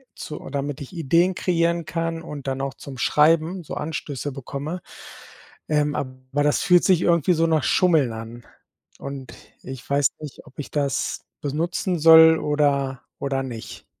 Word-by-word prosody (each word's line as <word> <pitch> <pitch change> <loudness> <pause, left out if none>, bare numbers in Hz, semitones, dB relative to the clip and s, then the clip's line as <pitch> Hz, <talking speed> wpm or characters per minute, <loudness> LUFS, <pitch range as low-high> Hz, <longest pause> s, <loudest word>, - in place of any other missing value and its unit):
zu 150 - -7
damit 140 0 -3
ich 140 - -9
Ideen 170 +3 +2
kreieren 170 -1 0
kann 165 -2 -3
und 145 -4 -8
dann 135 0 -2
auch 135 -1 -3
zum 135 -2 -10
Schreiben 165 +4 +3
so - - -8
Anstöße 145 -3 -4
bekomme, 140 +6 -6 0.9
ähm, 150 -1 +1
aber 130 +1 -4
das 150 - +2
fühlt 180 -1 +5
sich 185 -3 +4
irgendwie 170 0 +3
so 165 0 +2
nach 160 -3 +2
Schummeln 160 -10 +3
an. 115 +1 -8 0.6
Und 140 -1 -7 0.3
ich 130 -1 -9
weiß 140 0 +4
nicht, 150 -3 -9
ob - - -19
ich 145 - -6
das 140 -2 -2 0.2
benutzen 170 +4 -2
soll 160 0 +8
oder 140 -3 0 0.2
oder 135 -1 -1
nicht? 120 -4 -8
150 Hz, 155 wpm, -23 LUFS, 135-165 Hz, 0.9 s, soll